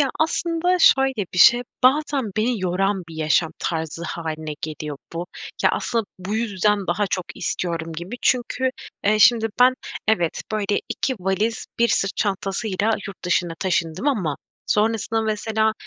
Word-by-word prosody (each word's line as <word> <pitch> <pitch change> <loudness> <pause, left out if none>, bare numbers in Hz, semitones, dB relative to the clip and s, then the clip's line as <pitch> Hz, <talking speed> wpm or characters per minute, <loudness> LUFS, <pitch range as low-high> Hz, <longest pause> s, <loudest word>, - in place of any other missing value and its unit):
Ya, 275 -2 +3
aslında 340 +2 +1
şöyle 265 - +4
bir 180 - -3
şey, 240 +7 +7 0.2
bazen 270 -3 +3
beni 225 0 +1
yoran 190 +2 0
bir 165 - -10
yaşam 155 +1 +2
tarzı 160 0 -3
hâline 160 -2 -4
geliyor 150 -1 -5 0.2
bu. 170 +1 -4 0.4
Ya, - - +6
asıl 230 -2 -1
bu 190 +3 -4
yüzden 210 -2 +1
daha 200 +4 +1
çok 185 - -1
istiyorum 165 -2 -3
gibi. 175 +8 -6
Çünkü, 255 +1 +1 0.3
eee, 215 +1 +3
şimdi, 225 +1 +5
ben 255 +1 +7 0.3
evet, 175 -7 +1
böyle, 205 -1 0
2 260 - -1
valiz, 200 +5 -1
1 235 - +4
sırt 195 -2 0
çantasıyla 200 +1 -1 0.2
yurt 195 -2 -10
dışına 175 -1 +1
taşındım 175 - 0
ama 185 - 0 0.3
sonrasında 225 +1 +1
mesela, 220 0 0
205 Hz, 150 wpm, -22 LUFS, 175-230 Hz, 0.4 s, şey